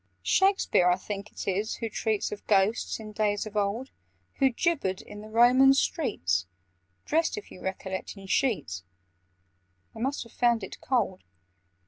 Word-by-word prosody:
"Shakspeare 385 - +3
I 180 - +4
think 200 +2 -6
it - - -7
is 200 +3 0
who 230 - -3
treats 220 -1 -1
Of 210 - -8
Ghosts, 205 +3 +2
in 215 -1 -8
days 210 -1 0
of 215 -1 -9
old, 210 +6 -1 0.5
Who 270 -1 +5
'gibbered 255 - 0
in 205 - -10
the 215 - -10
Roman 250 +4 +6
streets,' 90 - 0 0.6
Dressed, 320 -4 +1
if 210 - -8
you - - -12
recollect, 190 +1 -5
in 195 - -10
sheets— 190 - 0 1.1
They 225 - -9
must 270 +4 -1
have 230 - -17
found 235 -3 +2
it 190 - -8
cold. 225 -8 0
215 Hz, 155 wpm, -28 LUFS, 195-250 Hz, 1.1 s, Roman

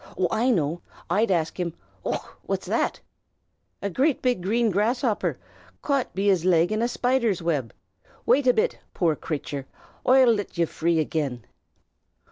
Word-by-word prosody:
Oh, 185 - +2
I 230 +4 +2
know! 170 - +1 0.3
I'd 210 +5 +2
ask 170 -2 0
him 170 -2 -2 0.3
Och! - - -4
what's - - -2
that? - - -1 0.8
A 200 - 0
big 255 - +1
green 225 +4 +1
grasshopper, 220 +3 0 0.5
caught 275 -3 0
be 195 +1 -1
his 185 -5 +3
leg 175 0 +3
in 215 +1 0
a 235 - +2
spider's 240 -6 0
wib. 145 -9 -1 0.5
Wait 265 0 +3
a 250 - +6
bit, 465 +3 0 0.2
poor 165 -4 +2
crathur, 145 -3 -4 0.4
oi'll 255 -2 +6
lit 205 -4 -4
ye 170 - +3
free 165 +1 0
agin." 140 -7 -2
195 Hz, 150 wpm, -25 LUFS, 165-240 Hz, 0.8 s, a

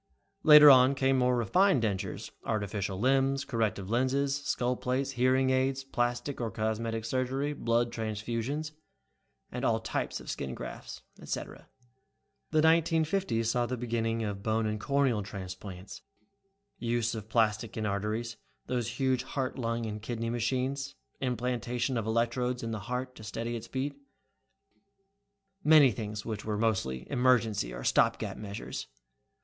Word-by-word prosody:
Later 150 -1 +10
on 130 +1 +6
came 135 -1 +2
more 125 0 +3
refined 135 - +3
dentures, 100 -4 -3
artificial 100 -3 -2
limbs, 135 +3 +2
corrective 110 -6 -1
lenses, 135 +3 +1
skull 125 -2 0
plates, 130 +2 -1
hearing 130 +1 +2
aids, 130 +1 +1
plastic 120 +1 -2
or 115 - -1
cosmetic 110 +2 -2
surgery, 130 +4 -1
blood 115 -3 +1
transfusions, 115 +7 -3 0.8
all - - +1
types - - -3
of - - -13
skin 65 -2 -4
grafts, - - -8 0.2
et - - -11
cetera. - - -5 0.8
"The 155 -1 +3
1950s 160 -5 +2
saw 120 +1 +1
the 125 - -3
beginning 115 -1 -1
of 100 -2 -4
bone 110 +1 0
and 105 0 -2
corneal 140 -5 +2
transplants, 95 -1 -8 0.8
use 115 -1 0
of 110 -1 -7
plastics 110 -1 +1
in 110 - -1
arteries, 105 +3 -2 0.3
those 120 -1 -2
huge 130 -2 +2
heart 130 0 -3
lung 115 -1 -1
and 105 -1 -5
kidney 115 0 -3
machines, 130 +4 -1 0.2
implantation 125 0 -1
of 115 -2 -2
electrodes 120 +2 0
in 115 - -3
the 110 - -3
heart 125 +1 -3
to - - -11
steady 115 +2 -4
its 115 0 -6
beat 140 +2 -3 1.7
many 150 -4 +7
things 105 0 -5
which 110 -3 -4
were 105 -1 -2
mostly 95 - 0
emergency 120 - +2
or - - -7
stop - - +3
gap - - -4
measures. 100 0 -6
120 Hz, 140 wpm, -30 LUFS, 110-130 Hz, 1.7 s, Later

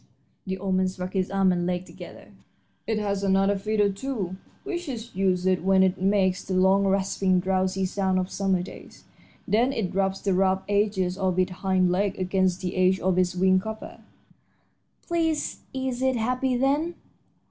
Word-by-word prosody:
And - - -3
the 190 - -2
old 190 0 -2
man 185 0 +2
struck 185 0 -5
his 190 -2 0
arm 195 -1 +2
and 175 -1 -1
leg 180 0 -2
together. - - -12 0.6
"It 220 - 0
has 200 -2 -1
another 195 +1 +3
fiddle, 205 0 +1
too, 200 -4 -4 0.3
which 355 -5 -4
it 235 -2 -6
uses 185 -1 +1
when 190 +1 +3
it 185 -1 0
makes 190 -1 +2
the 185 - -3
long, 190 +2 +4
rasping, 190 -1 +1
drowsy 190 +1 0
sound 190 0 0
of 185 0 -2
summer 190 -2 0
days. - - -12 0.4
Then 235 +5 +2
it 195 -8 -3
rubs 195 0 0
the 195 - 0
rough 190 +1 +2
edges 200 -2 0
of 185 -2 0
its 185 0 +1
hind 185 -1 +1
leg 195 +2 0
against 185 -1 0
the 180 -1 -3
edge 185 0 +3
of 185 -1 +1
its 180 0 +1
wing 185 +1 +4
cover." 220 +2 -7 1.1
"Please, 325 -3 -1
is 260 -1 -3
it 260 0 +2
happy, 250 +3 0
then?" 290 +6 +1
190 Hz, 175 wpm, -25 LUFS, 185-210 Hz, 1.1 s, long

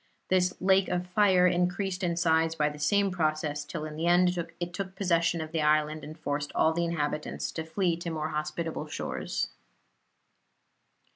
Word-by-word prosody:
This 180 -1 +2
lake 190 0 +3
of 180 0 -1
fire 185 -1 +4
increased 180 +2 +1
in 170 -1 0
size 160 -1 +2
by 150 -1 +2
the 150 0 -9
same 200 +5 +2
process 155 -3 -1
till 155 +1 -5
in 155 -1 -7
the 165 +2 -1
end 180 +1 +4 0.2
it 175 0 -4
took 190 0 -5
possession 170 -3 +1
of 155 0 -6
the 160 -1 0
island 155 0 +2
and 155 +2 -8
forced 145 -1 -3
all 160 - +3
the 170 +1 0
inhabitants 150 -2 -2
to 160 - -4
flee 170 +1 0
to 170 0 -5
more 155 -1 -2
hospitable 155 +2 -3
shores. - - -3
170 Hz, 170 wpm, -29 LUFS, 155-180 Hz, 0.2 s, fire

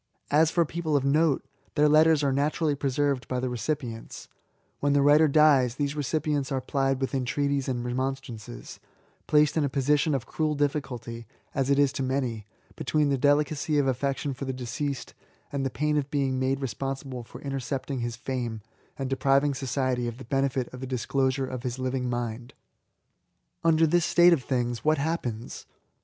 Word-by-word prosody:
As 155 +2 +5
for 170 0 +2
people 160 -1 -2
of 135 - -1
note« 150 +1 +2
— - - -38
^their 150 0 +5
letters 155 0 +5
are 140 -1 +2
naturally 150 +2 +1
preserved 140 -1 0
by 125 - -1
the 130 0 -1
recipients: 120 -2 -4 0.5
when 145 0 +2
the 145 - +4
writer 150 +2 +6
dies, 140 -5 +4
these 145 0 -2
recipients 145 -1 -1
are 135 - 0
plied 135 0 0
with 135 0 -2
entreaties 140 +1 0
and 120 -2 -2
remonstrances, 125 -2 -5 0.2
— - - -38
^placed 150 0 +4
in 155 - +3
a 140 - +1
posi 140 +2 +2
tion 150 0 +1
of 130 - -3
cruel 155 -1 -1
difficulty 125 -6 -3 0.3
(as 135 -1 0
it 140 - +4
is 140 -1 +3
to 140 - -3
many) 130 -5 -2 0.3
between 150 -2 +1
their 140 - +2
delicacy 145 +2 +2
of 145 - +3
affection 135 +2 -1
for 135 +2 -6
the 130 - -2
deceased, 130 +2 -4 0.4
and 140 -1 -2
the 135 - 0
pain 150 +5 0
of 145 -1 -1
being 135 -3 0
made 135 +1 0
responsible 135 +1 -4
for - - -11
intercept 135 0 -4
ing 135 - -2
his 120 -1 -3
fame, 120 -3 -4 0.4
and 135 - -3
depriving 135 +2 +2
society 130 -2 -1
of 120 0 -5
the 130 - -10
benefit 135 0 0
of 125 - -8
the 130 - -5
disclosure 130 +1 0
of 130 -1 -5
his 125 0 -4
living 130 -1 -2
mind. 120 0 -4 1.1
Under 165 -1 +4
this 170 +1 +2
state 175 0 +6
of 155 - +1
things, 120 -2 -2
what 155 +1 +3
happens? 140 -7 -3
135 Hz, 185 wpm, -27 LUFS, 125-145 Hz, 1.1 s, writer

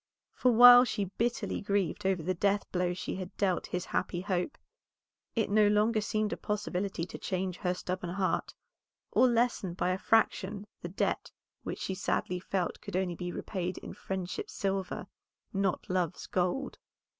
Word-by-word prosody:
For 250 - +3
while 245 +1 +10
she 200 -6 -2
bitterly 235 -3 0
grieved 200 -3 0
over 185 -4 +1
the 185 +3 0
death 200 +3 +1
blow 180 -1 0
she 185 - -4
had 185 -1 -7
dealt 190 -3 +1
his 180 0 -3
happy 180 -1 -1
hope, 185 +4 -2 0.8
it 225 -3 +2
no 210 0 +5
longer 215 +2 +3
seemed 215 0 0
a - - -4
possibility 200 -4 -2
to - - -9
change 185 -1 -2
her 180 -2 -1
stubborn 180 -1 -4
heart, 185 +1 -1 0.6
or 255 - +5
lessen 235 -7 +1
by 180 - +1
a 185 - -1
fraction 210 -2 +1 0.2
the 175 - -5
debt 190 - -1 0.3
which - - -5
she 190 - -2
sadly 180 -1 -1
felt 185 -1 -2
could - - -6
only 185 -2 0
be 175 +1 -4
repaid 185 0 -3
in - - -8
friendship's 190 - -5
silver, 195 -2 -2 0.5
not 195 -2 0
love's 180 -2 -1
gold. 185 +10 -1
190 Hz, 165 wpm, -31 LUFS, 180-210 Hz, 0.8 s, while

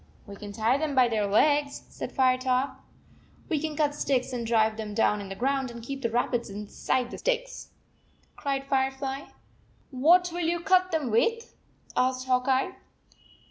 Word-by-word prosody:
"We 200 - -9
can 205 0 -8
tie 225 +6 +1
them 300 -2 -2
by 255 -2 +5
their 215 -3 0
legs," 285 +7 +2
said - - -6
Firetop. 260 +1 +1 0.7
"We 315 - +1
can 310 0 -3
cut 295 -1 +1
sticks 265 -3 -1
and 235 -2 -3
drive 220 -1 +3
them 215 -2 -6
down 210 -1 +2
in 195 - -8
the 195 - -5
ground, 270 +3 0
and 235 -1 -9
keep 275 +3 -6
the 230 - 0
rabbits 240 0 0
inside 210 +5 -2
the - - -7
sticks," - - -2 0.7
cried 275 -1 -2
Firefly. 270 0 -1 0.7
"What 340 +7 +4
will 350 - -3
you 340 +1 0
cut 370 +1 +3
them 305 -7 -1
with?" 460 - +1 0.4
asked 255 0 +1
Hawk 255 0 +1
Eye. 270 +8 +1
260 Hz, 170 wpm, -27 LUFS, 235-290 Hz, 0.7 s, by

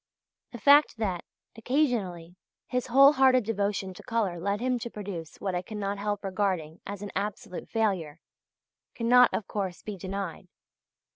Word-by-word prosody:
The 240 - -7
fact 285 +2 +5
that, 190 -6 -2 0.3
occasionally, 220 - -1 0.3
his 250 0 -2
whole 275 +4 +7
hearted 260 -3 +5
devotion 200 -3 -1
to - - -12
colour 210 -7 -1
led 200 +3 -1
him 250 +1 0
to 235 - -5
produce 190 -7 -7
what 190 -2 -2
I 180 - -1
cannot 200 0 -4
help 205 0 -2
regarding 185 -5 -2
as 200 0 -6
an 205 - -6
absolute 200 -2 -4
failure, 185 -9 -1 0.8
cannot, 245 +1 +5
of 215 - -2
course, 190 -4 -4
be 210 -2 -6
denied. 190 -1 -5
205 Hz, 150 wpm, -28 LUFS, 185-230 Hz, 0.8 s, whole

